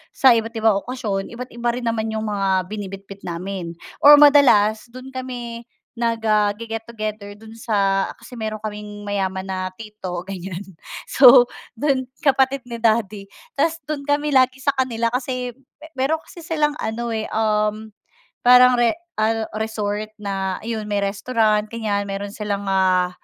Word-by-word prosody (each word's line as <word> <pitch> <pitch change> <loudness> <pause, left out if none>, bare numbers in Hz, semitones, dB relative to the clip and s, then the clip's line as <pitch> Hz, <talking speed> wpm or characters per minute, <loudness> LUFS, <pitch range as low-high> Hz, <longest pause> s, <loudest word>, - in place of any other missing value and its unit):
sa 265 - +6
iba't-ibang 225 -2 +1
okasyon 210 -6 -3
iba't-iba 240 0 -4
rin 250 - -5
naman 225 -1 -1
yung 220 0 -2
mga 190 -3 0
binibitbit 195 -1 -8
namin, 175 0 -5 0.3
or 290 - +9
madalas, 250 -8 +5
dun 255 +2 -11
kami 245 -2 -6 0.3
nag, 230 -1 -1
ah, 210 -1 +3
ge-get 225 0 -6
together 215 -3 -5
dun 220 0 -12
sa 200 -4 +1
kasi 250 - -12
meron 215 -2 -4
kaming 210 -1 -7
mayaman 190 -1 -2
na 185 -1 -3
tito 200 -5 -6
ganyan 185 -2 -6 0.5
so 250 -2 +8 0.2
dun 260 +2 0 0.2
kapatid 270 -2 +2
ni 235 - -6
daddy 210 -3 0 0.2
tapos 330 0 +1
dun 300 -2 -3
kami 290 +1 0
lagi 255 0 +4
sa 280 - +3
kanila 235 -3 0
kasi, 250 0 -3 0.4
pero 275 +5 0
kasi - - -13
silang 305 -2 0
ano 235 +1 -3
eh, 220 -1 -2
um, 215 0 0 0.5
parang 250 +1 +7
re 240 -1 +3 0.2
ah, 220 +1 +1
resort 215 -1 -3
na 195 -2 -3
yun 220 -2 -3
may 205 - +1
restaurant 215 +1 +1
ganyan 215 -3 -1
meron 200 0 -4
silang, 205 -2 -3
ah, 185 -1 +2
220 Hz, 145 wpm, -21 LUFS, 200-245 Hz, 0.5 s, or